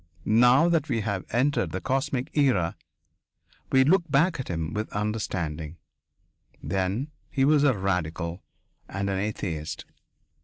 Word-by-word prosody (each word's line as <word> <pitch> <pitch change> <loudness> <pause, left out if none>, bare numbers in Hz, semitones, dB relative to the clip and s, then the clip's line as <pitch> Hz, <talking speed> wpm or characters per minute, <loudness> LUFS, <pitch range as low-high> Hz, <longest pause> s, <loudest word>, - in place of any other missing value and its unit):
Now 125 +8 +5
that 165 -3 +1
we 115 - 0
have 100 -3 -3
entered 135 +6 +1
the - - -3
cosmic 135 +1 -2
era, 125 - +2 1.0
we 130 0 +6
look 175 +6 +4
back 150 +4 +2
at 130 - -4
him 80 -2 -3
with 110 +1 -3
understanding. 90 -7 -3 0.9
Then, 95 - -1 0.2
he 135 -1 +1
was 145 0 +4
a 135 -6 +3
radical 85 -2 -2 0.5
and 100 +1 -2
an 95 - -1
atheist. 90 -7 -4
110 Hz, 130 wpm, -26 LUFS, 90-135 Hz, 1.0 s, we